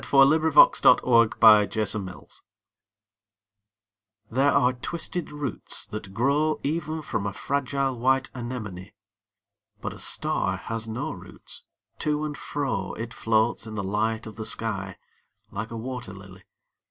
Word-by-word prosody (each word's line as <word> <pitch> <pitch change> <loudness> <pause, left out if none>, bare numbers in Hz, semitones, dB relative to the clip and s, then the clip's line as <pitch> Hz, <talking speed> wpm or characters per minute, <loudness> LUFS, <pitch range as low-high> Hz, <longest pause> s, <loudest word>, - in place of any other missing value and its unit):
DiqllzodbvCoOgle 155 +3 +6 1.0
STAR 110 -1 +1
SONG 95 -3 -5 2.0
These 125 - -2
are 135 -2 +4
twisted 170 +6 -4
roots 145 -7 -4
that 105 -2 -7
grow 140 +8 +1
Even 155 +1 -2
from 110 -7 -2
a 100 - -4
fragile 135 +1 -1
white 135 +2 +2
anemone. 110 -7 -6 0.9
'But - - -4
a - - -12
star - - -1
has 115 0 -4
no 110 +2 -3
roots: - - -9 0.3
to 150 0 0
and 150 -1 -4
fro 135 -12 -3
It 115 +1 -6
floats 110 0 +1
in 110 - -7
the 100 - -2
light 110 +3 -1
of 110 -2 -10
the 110 - -4
sky, 95 -5 -3 0.5
like 110 +1 -4
a 115 - -6
wat«r 125 -3 -6
]ily. 95 -1 -13
120 Hz, 130 wpm, -26 LUFS, 105-140 Hz, 2.0 s, DiqllzodbvCoOgle